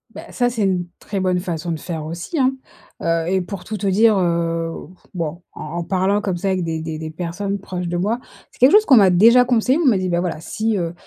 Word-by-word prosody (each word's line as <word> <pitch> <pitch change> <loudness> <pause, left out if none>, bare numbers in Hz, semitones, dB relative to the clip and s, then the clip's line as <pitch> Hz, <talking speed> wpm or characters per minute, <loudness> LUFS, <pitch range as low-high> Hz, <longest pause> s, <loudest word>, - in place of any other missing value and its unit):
Bah, - - -10
ça, 245 0 +1
c'est 230 -3 -2
une 185 -3 0
très 200 - -4
bonne 185 -1 +1
façon 170 -2 -4
de 160 - -3
faire 160 -2 -5
aussi, 170 - -5
hein. 260 0 +3 0.5
Heu 165 0 0
et 190 0 +1
pour 185 0 -7
tout 220 - -5
te 200 0 -2
dire, 215 +2 +4
heu, 165 -2 0 0.4
bon 170 -1 -4
en - - -8 0.2
en 170 - -3
parlant 190 +3 +1
comme 190 -4 -2
ça 195 - -3
avec 185 -1 0
des 165 -1 -3
des 160 0 -5
des 155 - -5
des 160 0 -6
personnes 190 +4 -4
proches 180 -2 -5
de 175 - -2
moi, 215 +7 0 0.3
c'est - - -22
quelque 255 +3 +6
chose 425 +1 +6
qu'on 270 - +6
m'a 195 -4 +6
déjà 230 +8 +6
conseillé. 250 +2 +2
On - - 0
m'a 225 -7 +4
dit: 185 - -2
«Bah 175 0 +1
voilà 175 -4 -3
si, 215 +6 -2
heu, 170 -2 -2
185 Hz, 255 wpm, -20 LUFS, 170-215 Hz, 0.5 s, quelque